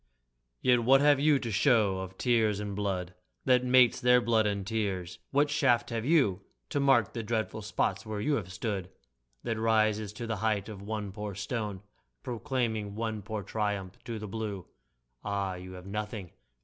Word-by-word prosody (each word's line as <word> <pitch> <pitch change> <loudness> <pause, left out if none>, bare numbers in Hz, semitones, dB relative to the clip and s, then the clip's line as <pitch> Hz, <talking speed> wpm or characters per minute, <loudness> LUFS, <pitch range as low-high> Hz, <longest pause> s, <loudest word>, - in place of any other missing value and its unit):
Yet 125 -2 +4
what 135 +3 +6
have 145 -1 +5
you 150 0 +4
to 120 -4 -4
show 105 -4 +3
of 95 0 -7
tears 110 -4 +2
and 105 -1 -4
blood, 95 -3 -2 0.3
That 125 -1 +4
mates 125 -2 +5
their 125 0 +6
blood 115 -2 +2
and 100 -2 -2
tears? 95 -5 -2
What 145 +1 +2
shaft 130 -6 +2
have 115 -1 -2
you, 130 - +3 0.3
To - - 0
mark 135 -6 +3
the 115 - -3
dreadful 110 0 -2
spots 105 - -1
where 110 -1 -4
you 145 +8 +1
have 95 -9 -2
stood, 100 -3 -3 0.5
That 115 -1 -2
rises 110 -2 +2
to 115 +2 -6
the 115 -2 -2
height 105 -1 0
of 100 -3 -8
one 105 -1 -4
poor 105 0 -6
stone 105 -2 -4 0.4
Proclaiming 115 -5 -2
one 110 -1 -3
poor 105 0 -5
triumph 100 -3 -3
to 115 -2 -4
the 105 0 -6
blue? 105 -3 -4 0.6
Ah, 100 -2 -1
you 90 +1 -8
have 90 0 -10
nothing! 105 -2 -5
110 Hz, 175 wpm, -30 LUFS, 100-120 Hz, 0.6 s, what